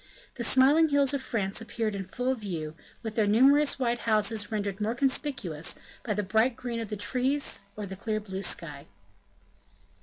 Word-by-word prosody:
The 240 Hz, -, -5 dB
smiling 280 Hz, +7 st, +5 dB
hills 285 Hz, -1 st, +4 dB
of 280 Hz, -, -1 dB
France 210 Hz, -5 st, -2 dB
appeared 225 Hz, -1 st, -3 dB
in 195 Hz, -1 st, -4 dB
full 250 Hz, +7 st, -2 dB
view, 175 Hz, -10 st, -5 dB, 0.3 s
with 220 Hz, -2 st, -4 dB
their 215 Hz, -2 st, +2 dB
numerous 275 Hz, +7 st, +4 dB
white 240 Hz, -2 st, 0 dB
houses 215 Hz, -1 st, +1 dB
rendered 205 Hz, -1 st, -3 dB
more 220 Hz, +3 st, 0 dB
conspicuous 260 Hz, -, 0 dB, 0.3 s
by 215 Hz, -3 st, -2 dB
the 210 Hz, -, -1 dB
bright 220 Hz, +5 st, +2 dB
green 240 Hz, -2 st, -4 dB
of 225 Hz, -3 st, -5 dB
the 210 Hz, -, -4 dB
trees 255 Hz, +1 st, 0 dB
or 210 Hz, -, -5 dB
the 190 Hz, 0 st, -7 dB
clear 215 Hz, +2 st, -2 dB
blue 195 Hz, -2 st, -6 dB
sky. 155 Hz, -5 st, -3 dB
220 Hz, 175 wpm, -28 LUFS, 200-260 Hz, 0.3 s, smiling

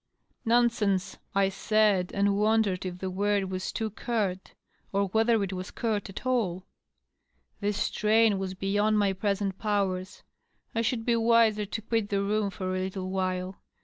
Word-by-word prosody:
" -, -, -44 dB
Nonsense 210 Hz, -6 st, +2 dB
!" -, -, -35 dB
I -, -, +1 dB
said, 195 Hz, -2 st, +2 dB
and 200 Hz, 0 st, +2 dB
wondered 210 Hz, -3 st, +2 dB
if 180 Hz, -1 st, -6 dB
the 190 Hz, +1 st, -4 dB
word 200 Hz, 0 st, 0 dB
was 185 Hz, 0 st, -3 dB
too 220 Hz, -1 st, -3 dB
curt, 200 Hz, -4 st, -3 dB, 0.4 s
or 200 Hz, 0 st, +1 dB
whether 225 Hz, +1 st, +3 dB
it 195 Hz, -1 st, -3 dB
was 185 Hz, 0 st, -5 dB
curt 215 Hz, -4 st, -2 dB
at 195 Hz, -, -8 dB
all. 200 Hz, -8 st, 0 dB, 0.9 s
This 205 Hz, 0 st, -1 dB
strain 215 Hz, -1 st, +2 dB
was 190 Hz, -1 st, -4 dB
beyond 205 Hz, +3 st, +1 dB
my 200 Hz, -2 st, +2 dB
present 195 Hz, 0 st, -1 dB
powers; 195 Hz, -3 st, -1 dB, 0.5 s
I 230 Hz, -, +1 dB
should 230 Hz, -1 st, -1 dB
be 235 Hz, -, +3 dB
wiser 225 Hz, -2 st, +3 dB
to 220 Hz, -, -4 dB
quit 225 Hz, -2 st, -1 dB
the 200 Hz, -1 st, 0 dB
room 210 Hz, 0 st, 0 dB
for 185 Hz, -1 st, -3 dB
a -, -, -1 dB
little 185 Hz, 0 st, -4 dB
while. 185 Hz, 0 st, -2 dB
200 Hz, 170 wpm, -28 LUFS, 190-220 Hz, 0.9 s, whether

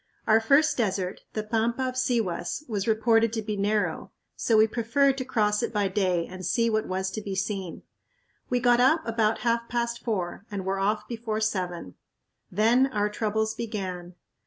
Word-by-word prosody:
Our 220 Hz, 0 st, +5 dB
first 280 Hz, +7 st, +3 dB
desert, 190 Hz, -5 st, -1 dB
the 215 Hz, -, -2 dB
pampa 230 Hz, +3 st, 0 dB
of 255 Hz, -, -3 dB
Sihuas, 245 Hz, -, -1 dB
was 205 Hz, -4 st, -2 dB
reported 225 Hz, 0 st, +3 dB
to 220 Hz, -2 st, -2 dB
be 210 Hz, 0 st, -3 dB
narrow, 205 Hz, +1 st, -1 dB, 0.2 s
so 225 Hz, -, +2 dB
we 215 Hz, -, +7 dB
preferred 245 Hz, +5 st, +1 dB
to 260 Hz, -, -3 dB
cross 210 Hz, -4 st, +1 dB
it 235 Hz, -, -2 dB
by 205 Hz, -3 st, 0 dB
day 185 Hz, -3 st, +1 dB
and 185 Hz, +1 st, -9 dB
see 230 Hz, +6 st, +1 dB
what 215 Hz, 0 st, 0 dB
was 190 Hz, +1 st, -2 dB
to 215 Hz, -, -4 dB
be 200 Hz, -2 st, -5 dB
seen. 190 Hz, -2 st, -3 dB, 0.7 s
We 250 Hz, -, +1 dB
got 240 Hz, 0 st, +4 dB
up 315 Hz, +6 st, +4 dB
about 225 Hz, -1 st, +1 dB
half 235 Hz, 0 st, +1 dB
past 235 Hz, 0 st, -2 dB
four 195 Hz, -5 st, -3 dB
and 195 Hz, -2 st, -5 dB
were 195 Hz, 0 st, -1 dB
off 210 Hz, +2 st, 0 dB
before 225 Hz, -2 st, -3 dB
seven. 180 Hz, -, -2 dB, 0.6 s
Then 230 Hz, +7 st, +4 dB
our 210 Hz, -5 st, 0 dB
troubles 220 Hz, +1 st, -1 dB
began. 185 Hz, -6 st, -5 dB
215 Hz, 180 wpm, -26 LUFS, 195-235 Hz, 0.7 s, we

